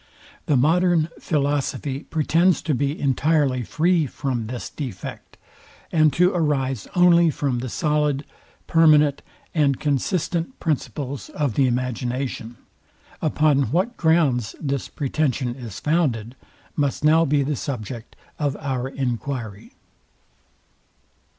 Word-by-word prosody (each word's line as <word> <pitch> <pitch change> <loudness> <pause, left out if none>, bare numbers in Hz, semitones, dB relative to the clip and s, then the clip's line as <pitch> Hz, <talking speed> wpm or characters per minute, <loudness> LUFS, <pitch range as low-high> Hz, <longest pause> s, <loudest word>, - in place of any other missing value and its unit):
The 145 - +3
modern 165 +3 +3
philosophy 145 -2 -1
pretends 165 +3 +2
to 155 - 0
be 140 +3 -1
entirely 140 -1 +2
free 165 - +1
from 125 -4 -3
this 125 +1 -5
defect, 125 - -7 0.5
and 155 -2 +4
to 180 +4 +4
arise 135 - 0
only 170 -1 +6
from 140 -4 -1
the 125 +1 -4
solid, 150 0 0 0.4
permanent, 150 -3 +4 0.3
and 145 -5 +2
consistent 165 - -1
principles 140 -3 -3
of 145 -6 -1
the 135 +4 +3
imagination. 125 -1 -3 0.6
Upon 150 -5 +2
what 190 - 0
grounds 150 -9 +2
this 140 -3 -3
pretension 135 -3 -1
is 120 -6 -8
founded 130 -8 0 0.4
must 145 -1 -1
now 160 +2 +5
be 145 -2 +2
the 145 +2 -1
subject 120 -3 -6 0.2
of 145 -2 -1
our 130 -3 -2
enquiry. 120 -5 -4
140 Hz, 110 wpm, -23 LUFS, 130-155 Hz, 0.6 s, only